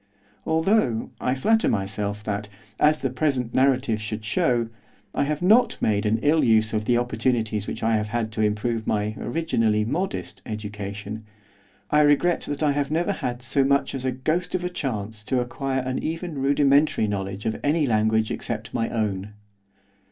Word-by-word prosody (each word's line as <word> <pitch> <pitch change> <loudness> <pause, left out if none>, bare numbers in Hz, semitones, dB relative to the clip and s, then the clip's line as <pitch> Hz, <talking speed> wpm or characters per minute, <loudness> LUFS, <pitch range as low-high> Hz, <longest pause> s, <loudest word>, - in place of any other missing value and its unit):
Although, 160 - +1
I 130 0 +1
flatter 220 +12 +2
myself 100 +1 -2
that, 105 0 -3 0.3
as 155 +1 +4
the 135 -4 -2
present 130 -3 0
narrative 130 -4 +2
should 110 0 -5
show 120 +1 +1 0.5
I - - +1
have 150 +3 -2
not 220 +5 +5
made 105 0 +1
an 110 +1 +2
ill 155 +2 +4
use 110 -1 +3
of 105 -1 -1
the 120 +1 +3
opportunities 115 -3 0
which - - -5
I 110 0 +3
have 105 0 -2
had 110 0 -2
to 110 - -2
improve 110 +2 0
my, 105 0 0
originally, 115 -7 0
modest 175 - -3
education, 105 0 -6 0.7
I 150 - +5
regret 150 +4 +3
that 145 +1 -2
I 150 - +4
have 140 0 -1
never 170 +6 +1
had 125 -9 -4
so 135 +2 +2
much 140 +1 +2
as 135 -2 -4
a 130 - 0
ghost 155 +9 -1
of 180 - -1
a 180 - -1
chance 110 - -4
to 130 - +1
acquire 130 +2 -2
an 130 0 -2
even 165 -2 -4
rudimentary 140 -2 +3
knowledge 100 0 -4
of 110 -1 -1
any 150 +1 +2
language 110 -2 +2
except 110 -2 -4
my 115 - 0
own. 105 -3 -2
120 Hz, 175 wpm, -24 LUFS, 110-145 Hz, 0.7 s, not